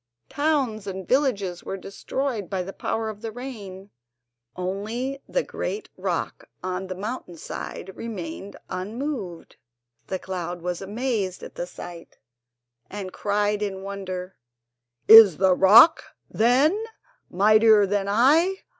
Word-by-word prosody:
Towns 270 -8 0
and 190 -2 -6
villages 205 -10 0
were 195 - -5
destroyed 210 +2 -4
by 190 -2 -2
the 195 +2 -8
power 225 0 -3
of 215 -1 -7
the 225 -1 -5
rain, 205 -6 -9 0.6
only 220 +9 -4
the - - 0
great 425 - -5
rock - - -4
on 185 +1 -3
the 185 - -5
mountain 200 -3 -6
side 190 +3 -7
remained 230 -1 -7
unmoved. 210 - -5 0.5
The 190 - -2
cloud 180 -2 -5
was 180 0 -3
amazed 205 -2 -3
at - - -9
the 175 - -5
sight, 175 -1 -11 0.7
and 195 -2 -7
cried 205 0 0
in 195 -2 -3
wonder: 190 -2 -6 0.7
"Is 215 -7 +10
the 190 0 +4
rock, 215 - +7 0.3
then, 275 - +3 0.5
mightier 215 +2 +5
than 200 0 -1
I? 310 - +3
205 Hz, 125 wpm, -24 LUFS, 190-245 Hz, 0.7 s, Is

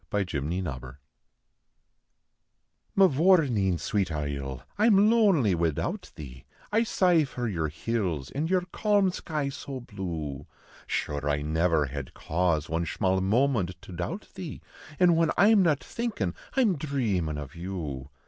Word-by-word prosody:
PATRICK 90 -9 -1
S 95 +2 -1
DAY 65 -5 -6 2.0
Mavourneen, 150 - +4
swate 95 0 -1
isle, 70 -3 -4
I 215 +3 +3
am 210 0 +5
lonely 190 - +4
widout 85 -3 -1
thee, 65 -4 -10 0.3
I 220 +2 +3
sigh 180 -8 +3
for 125 -3 -4
your 85 -7 -1
hills 85 - -2
an 150 +4 -2
your 185 0 +2
calm 205 -3 +2
sky 150 -5 -3
so 135 0 -6
blue; 85 - -5 0.4
Shure 75 0 -2
I 75 0 0
niver 80 0 +2
had 70 0 -7
cause 85 -2 0
one 80 +1 -1
shmall 95 +3 0
moment 100 -4 +1
to - - -11
doubt 90 - -5
thee, 175 -5 -7 0.4
An 180 -1 +6
whin 165 -1 +3
I 200 +4 +6
m 215 -3 +6
not 150 -7 +2
thinkin 215 - -3 0.2
I - - +5
m 205 -9 +2
dhreamin 105 - -1
of 70 -2 -8
you. 80 -7 -5
95 Hz, 145 wpm, -27 LUFS, -, 2.0 s, An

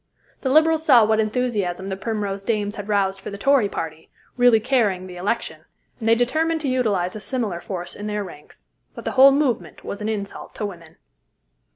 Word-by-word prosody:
The 265 - -1
Liberals 315 +2 +4
saw 250 -8 +6
what 220 0 +2
enthusiasm 210 -5 -1
the 190 - -2
Primrose 200 -1 -3
Dames 210 -2 -1
had 205 0 -7
roused 195 -2 +1
for - - -6
the 200 - -7
Tory 260 -2 +3
party, 160 -3 -6 0.3
really 245 -2 +5
carrying 215 -6 +1
the 180 -1 -9
election, 200 +6 -3 0.4
and 225 -1 -1
they 230 - +6
determined 315 +7 +1
to 290 - -2
utilize 215 -9 0
a - - -5
similar 215 -7 -3
force 175 -3 -5
in 205 - -6
their 210 0 -2
ranks. 150 -6 -14 0.3
But - - -9
the - - -1
whole 270 +1 +7
movement 275 -4 -1
was 200 - -6
an 210 - -2
insult 200 -2 -5
to 215 - -3
women. 170 -5 -9
210 Hz, 195 wpm, -22 LUFS, 195-250 Hz, 0.4 s, whole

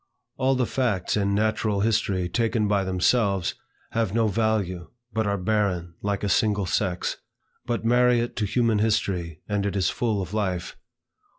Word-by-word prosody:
All 135 0 +2
the 130 -1 +1
facts 110 -8 0
in 100 -1 +1
natural 110 -1 +1
history 100 -4 +1
taken 115 +2 0
by 100 -1 +2
themselves, 95 +1 +1 0.4
have 110 -3 -1
no 115 -1 +3
value, 100 -5 -1 0.2
but 110 -1 0
are 100 0 0
barren, 90 -3 0
like 100 0 -2
a - - +1
single 105 0 +2
sex. 90 -1 -1 0.5
But 120 -2 -2
marry 125 +1 +4
it 120 +1 -3
to 110 - +1
human 115 0 +2
history, 90 -7 0
and 105 -1 0
it 100 0 -2
is 95 -4 +1
full 110 -4 -1
of 95 0 -5
life. 95 -5 -2
105 Hz, 165 wpm, -25 LUFS, 95-115 Hz, 0.5 s, marry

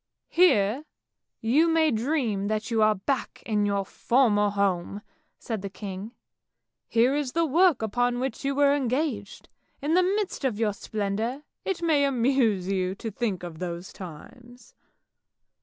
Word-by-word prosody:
" - - -60
Here 235 - +4 0.6
you 275 +9 +3
may 320 -1 +3
dream 225 -4 0
that 215 +2 -2
you 225 -1 +2
are 215 0 +4
back 245 +7 -3
in 210 -2 +1
your 200 -1 0
former 210 -3 +2
home! 200 0 -1 0.2
" - - -42
said 225 -4 -4
the 200 - -5
king. 200 +3 -7 0.3
" - - -59 0.3
Here 235 +3 +3
is 285 -3 -2
the 335 0 +2
work 320 -3 +3
upon 245 +3 0
which 260 -1 -3
you 275 0 0
were 285 0 +4
engaged; 260 -6 -2 0.3
in 295 +3 -1
the 365 - +5
midst 390 -2 -1
of 250 -6 0
your 215 -2 +1
splendour, 215 +7 -3 0.2
it 360 -3 -2
may 310 -4 +3
amuse 245 -7 +2
you 190 -1 -1
to 225 +2 -6
think 205 -4 -2
of 165 -3 -7
those 175 0 -5
times." 240 +8 -12
230 Hz, 160 wpm, -26 LUFS, 200-275 Hz, 0.6 s, the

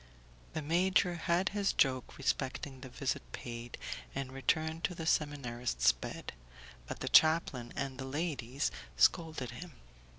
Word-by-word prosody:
The 155 - -2
major 180 +3 +3
had 175 +3 +1
his 200 -1 +1
joke 130 -2 +1
respecting 135 0 -2
the 130 - -8
visit 130 +1 -1
paid 120 0 -6 0.4
and 135 -1 -3
returned 160 +4 0
to 180 - -2
the 165 - -5
seminarist's 125 - +2
bed, - - -7 0.5
but - - -6
the - - -1
chaplain 155 -7 +5
and 135 -1 -3
the 130 - -3
ladies 140 -3 -1 0.3
scolded 135 - +3
him. 165 +6 -8
140 Hz, 135 wpm, -33 LUFS, 125-165 Hz, 0.5 s, chaplain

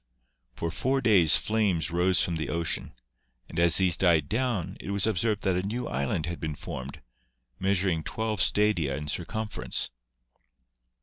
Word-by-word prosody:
For 85 - -3
four 130 +10 0
days 95 - +5
flames 100 -7 0
rose 90 +1 +3
from 85 -2 -1
the 80 - -3
ocean, 85 -6 -2 0.5
and 80 - -4
as 85 -1 +4
these 95 -3 +3
died 85 -6 +3
down 115 -6 -1
it - - -8
was 100 -1 +1
observed 110 0 0
that 95 -2 +1
a 90 - 0
new 115 +6 -3
island 70 +5 -2
had 85 0 -5
been 75 -2 -4
formed, 65 -2 -8 0.6
measuring 95 -3 +1
twelve 110 0 -1
stadia 90 -10 +2
in 75 +2 -6
circumference. 105 - -2
90 Hz, 150 wpm, -27 LUFS, 80-105 Hz, 0.6 s, days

